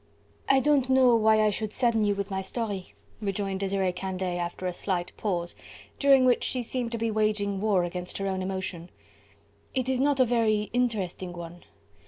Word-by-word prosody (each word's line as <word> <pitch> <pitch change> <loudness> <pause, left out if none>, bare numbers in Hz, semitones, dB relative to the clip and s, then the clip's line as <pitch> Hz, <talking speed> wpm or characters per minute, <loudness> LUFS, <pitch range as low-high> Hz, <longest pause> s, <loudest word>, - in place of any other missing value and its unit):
"I 270 - +6
don't 275 -2 +2
know 260 -2 +5
why 220 -1 +4
I 210 - +3
should 215 0 -3
sadden 235 -2 +2
you 205 -1 +2
with 200 0 -4
my 190 0 -1
story," 200 -2 -4 0.3
rejoined 195 -1 -2
Desiree 195 -1 0
Candeille 185 -1 -3
after 175 +1 -4
a 180 - -1
slight 175 -1 -3
pause, 175 -5 -2 0.4
during 275 -2 +5
which 250 -1 +3
she 250 -1 -2
seemed 240 0 -3
to - - -1
be 225 0 -1
waging 210 -2 0
war 205 -4 +2
against 180 +1 -4
her 195 - -3
own 190 -1 -1
emotion. 185 -2 -4 0.9
"It 255 -1 0
is 260 -1 0
not 280 0 +2
a 255 - +6
very 220 -3 +1
interesting 200 -7 -1
one. 175 0 -9
205 Hz, 185 wpm, -27 LUFS, 185-235 Hz, 0.9 s, I